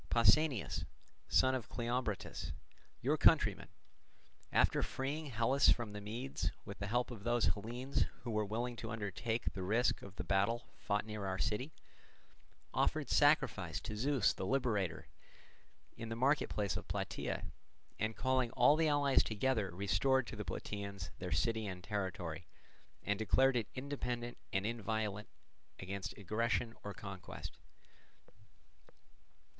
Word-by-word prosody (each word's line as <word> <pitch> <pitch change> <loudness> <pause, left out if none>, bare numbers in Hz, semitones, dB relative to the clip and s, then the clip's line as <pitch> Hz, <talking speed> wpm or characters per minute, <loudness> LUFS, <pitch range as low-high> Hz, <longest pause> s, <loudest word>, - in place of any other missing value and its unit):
Pausanias, 120 +2 +4 0.5
son 130 - +5
of 130 -4 -3
Cleombrotus, 120 -4 -2 0.5
your - - +3
countryman, - - +4 0.8
after - - +4
freeing 145 +4 -2
Hellas 130 +3 +3
from 115 -3 +2
the 105 - -5
Medes 120 +6 -3 0.2
with 100 +1 -8
the 100 - -3
help 120 +3 0
of 110 -5 -8
those 120 0 +3
Hellenes 120 +6 -1 0.2
who 120 - -3
were 110 0 +1
willing 120 +4 -2
to 115 - -5
undertake 110 +2 -2
the 95 - -4
risk 110 +7 +2
of 100 -1 -10
the - - -4
battle 100 +5 +1
fought 105 +1 0
near 105 -2 -4
our 95 0 -1
city, 115 +8 -1 1.0
offered - - +1
sacrifice - - +3
to 105 - -5
Zeus 130 0 +3
the - - -5
Liberator 105 -10 0 0.9
in 115 - -6
the 115 - -2
marketplace 115 -6 +1
of - - -5
Plataea, - - -2 0.6
and 110 0 0
calling 130 -2 +2
all 145 - +6
the 160 0 +3
allies 145 -2 +4
together 110 -2 0
restored 100 +9 +2
to - - -7
the 105 - -4
Plataeans 100 -4 -5
their 90 -1 -4
city 110 +8 +1
and 90 -2 -6
territory, 95 -5 -3 0.6
and 100 0 0
declared 130 +4 +4
it 115 -4 +1
independent 125 -3 -3
and 95 +1 0
inviolate 110 -2 -2 0.5
against 95 0 -5
aggression 115 +3 0
or 100 -1 -5
conquest. 95 -2 -7
110 Hz, 135 wpm, -36 LUFS, 100-125 Hz, 1.0 s, all